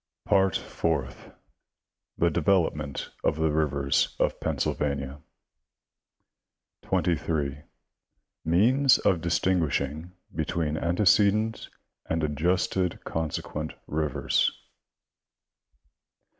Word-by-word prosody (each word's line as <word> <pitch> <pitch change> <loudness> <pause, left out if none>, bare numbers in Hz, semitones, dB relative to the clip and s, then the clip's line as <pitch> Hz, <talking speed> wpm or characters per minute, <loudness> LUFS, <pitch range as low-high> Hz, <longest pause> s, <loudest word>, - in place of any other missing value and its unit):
Part 95 -3 +3
Fourth. 70 -7 -3 0.9
The 85 0 +2
development 75 -5 0
of - - +2
the 80 0 +1
rivers 70 -3 +1
of - - +1
Pennsylvania. 70 -1 -2 1.6
23. 80 -5 -1 0.8
Means 120 - +4
of 90 -4 +1
distinguishing 80 -2 0 0.2
between 80 0 -1
antecedent 105 +6 +2 0.4
and 80 0 -1
adjusted 90 +4 0
consequent 80 -1 -4
rivers. 75 0 +1
80 Hz, 70 wpm, -27 LUFS, 75-90 Hz, 1.6 s, Means